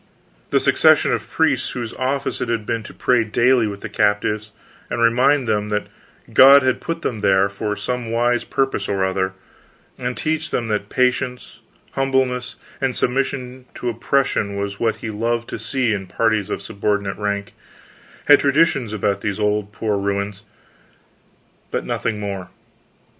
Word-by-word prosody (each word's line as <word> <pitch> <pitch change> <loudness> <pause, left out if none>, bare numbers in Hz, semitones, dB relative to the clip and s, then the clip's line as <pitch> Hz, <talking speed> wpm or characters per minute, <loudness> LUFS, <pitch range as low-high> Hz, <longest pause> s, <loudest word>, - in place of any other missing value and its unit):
The - - +3
succession - - +4
of - - -3
priests - - +1
whose 120 -3 -5
office 135 +2 -2
it - - -2
had 115 -2 -1
been 115 +1 -1
to - - -9
pray 125 -3 +2
daily 120 +2 +3
with 100 -1 -6
the - - -5
captives 105 +1 0 0.4
and 120 - -3
remind 125 +4 +3
them 105 -1 0
that 105 0 -1 0.5
God 140 +1 +8
had 130 -1 +1
put 165 0 -4
them 110 -4 -2
there, 95 -1 +4
for 105 +1 -3
some 125 +1 -3
wise 120 +1 +1
purpose 135 -7 -1
or 95 -1 +1
other, 95 0 -1 0.7
and 125 0 -3
teach 160 0 -1
them 115 -2 -2
that 105 -1 -2
patience, 125 0 -1 0.3
humbleness, 130 -2 0 0.3
and 130 -2 0
submission 130 0 -2
to 125 - -3
oppression 115 -3 0
was 100 0 -4
what 115 -1 +1
He 110 - -6
loved 115 +2 -1
to - - -5
see 120 0 0
in 95 -2 -4
parties 110 -1 0
of - - -3
a - - -12
subordinate 100 -1 -2
rank, 100 -1 -2 0.7
had 145 - +7
traditions 140 -5 +2
about 100 -1 -1
these 100 -2 -2
poor 105 -1 +1
old 105 0 -4
human 105 -3 0
ruins, 100 0 -2 1.3
but - - -3
nothing 110 -2 -2
more. 100 -3 -5
115 Hz, 165 wpm, -21 LUFS, 105-125 Hz, 1.3 s, God